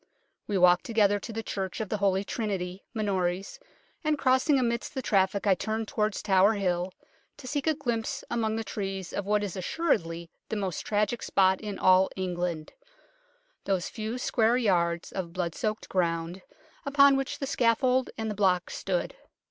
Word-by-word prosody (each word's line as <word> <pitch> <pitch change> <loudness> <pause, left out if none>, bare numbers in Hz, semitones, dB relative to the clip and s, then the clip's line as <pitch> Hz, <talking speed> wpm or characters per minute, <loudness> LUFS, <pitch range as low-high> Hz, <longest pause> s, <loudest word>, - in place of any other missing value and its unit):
We 205 - 0
walked 180 0 +5
together 205 -3 +3
to 230 - -7
the 225 0 -4
Church 190 -3 -4
of 215 -3 -3
the 215 - -1
Holy 195 -1 +1
Trinity, 195 -4 -3
Minories, 195 - -2 0.4
and 305 -1 +1
crossing 265 +2 +3
amidst 235 -2 -1
the 265 - -1
traffic 195 -1 +1
I 200 - +5
turned 220 +4 -2
towards 210 -1 -1
Tower 195 +2 +4
Hill 180 -3 -1 0.5
to 270 - -12
seek 285 +3 -2
a 315 - +3
glimpse 255 -1 -2
among 220 -2 0
the 225 - -2
trees 195 -4 -5
of 200 -1 -3
what 210 0 +2
is 200 -4 -4
assuredly 170 - -1 0.2
the - - -2
most 195 -4 -3
tragic 210 +3 0
spot 190 -1 +2
in 205 -3 -5
all 185 +1 +5
England 175 -4 -3 0.9
those 190 -3 0
few 220 +2 -4
square 235 -1 +2
yards 170 -7 +1
of 175 -3 -5
blood 175 -2 -2
soaked 215 +3 -3
ground 170 0 -1 0.4
upon 280 -1 +5
which 270 0 -2
the 275 - -3
scaffold 255 0 +2
and 220 -1 -2
the - - -2
block 190 -3 +1
stood. - - -2
205 Hz, 170 wpm, -28 LUFS, 185-230 Hz, 0.9 s, walked